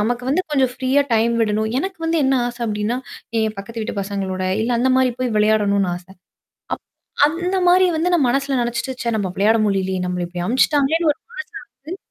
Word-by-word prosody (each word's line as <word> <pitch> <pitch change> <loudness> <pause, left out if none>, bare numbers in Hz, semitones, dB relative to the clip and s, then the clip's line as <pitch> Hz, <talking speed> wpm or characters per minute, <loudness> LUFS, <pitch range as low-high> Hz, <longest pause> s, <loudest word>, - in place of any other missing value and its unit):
நமக்கு 240 +3 -1
வந்து 360 +6 +2
கொஞ்சம் 265 -4 +2
ஃப்ரீயா 260 +2 +2
டைம் 230 +1 +2
விடணும். 220 0 +1
எனக்கு 380 +4 -4
வந்து 325 0 +1
என்ன 265 0 +3
ஆசை 245 0 -7
அப்படின்னா, 210 +2 -1 0.4
என் 220 -1 -1
பக்கத்து 225 +3 -6
வீட்டு 210 -1 -3
பசங்களோட, 195 -1 -3 0.2
இல்ல, 235 - -1
அந்த 260 +2 +2
மாரி 260 -1 +3
போய் 250 -3 -1
விளையாடணும்னு 205 -3 +2
ஆசை. 180 +2 -13 0.6
அப் - - -16 0.5
அந்த 355 +4 -2
மாரி 370 +1 +6
வந்து 345 +3 0
நான் 295 -7 +3
மனசுல 275 +1 0
நினச்சுட்டு, 240 +2 -3
சே! 235 - 0
நம்ம 195 -3 -2
விளையாட 215 +3 +3
முடியலயே. 190 -2 0
நம்மள 180 -1 -2
இப்படி 175 0 -4
அனுப்பச்சுட்டாங்களேன்னு 290 - +2
ஒரு 295 - -23
மனசு 470 -1 -7 0.3
வந்து 315 +7 -7
240 Hz, 190 wpm, -20 LUFS, 210-280 Hz, 0.6 s, மாரி